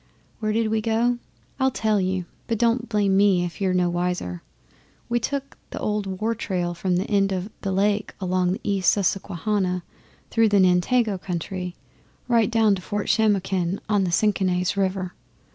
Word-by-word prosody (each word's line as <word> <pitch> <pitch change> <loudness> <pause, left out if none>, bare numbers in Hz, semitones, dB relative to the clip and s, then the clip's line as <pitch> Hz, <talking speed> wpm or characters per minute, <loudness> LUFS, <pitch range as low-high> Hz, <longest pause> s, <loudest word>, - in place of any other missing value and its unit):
Where 215 -1 -1
did 225 0 +1
we 220 0 +1
go? 235 +2 +1 0.4
I'll 265 0 +3
tell 215 -5 +1
you, 185 -1 -1 0.2
but 230 - 0
don't 235 +1 +1
blame 205 -3 +2
me 195 -3 +4
if 175 +3 -7
you're 190 -1 +2
no 180 -1 +2
wiser. 175 - -2 0.7
We 240 0 +2
took 275 +3 -4
the - - -7
old 200 -3 -2
war 225 +2 +1
trail 180 -6 -2
from 180 +1 -1
the 180 - +1
end 200 -2 +2
of 190 +2 -3
the 195 - -2
Lake 205 +2 0
along 185 -1 +1
the - - -6
East 195 -2 +2
Susquehanna 190 -1 -1 0.5
through 225 -1 +4
the 205 -1 +4
Nantego 190 +4 +3
country, 180 0 -4 0.5
right 230 -3 +3
down 225 -3 +4
to 190 - -3
Fort 205 +2 -3
Shamokin 195 -4 +1
on 205 -2 +2
the 180 - 0
Senachse 185 -1 +1
river. 190 -2 -1
195 Hz, 170 wpm, -24 LUFS, 180-215 Hz, 0.7 s, me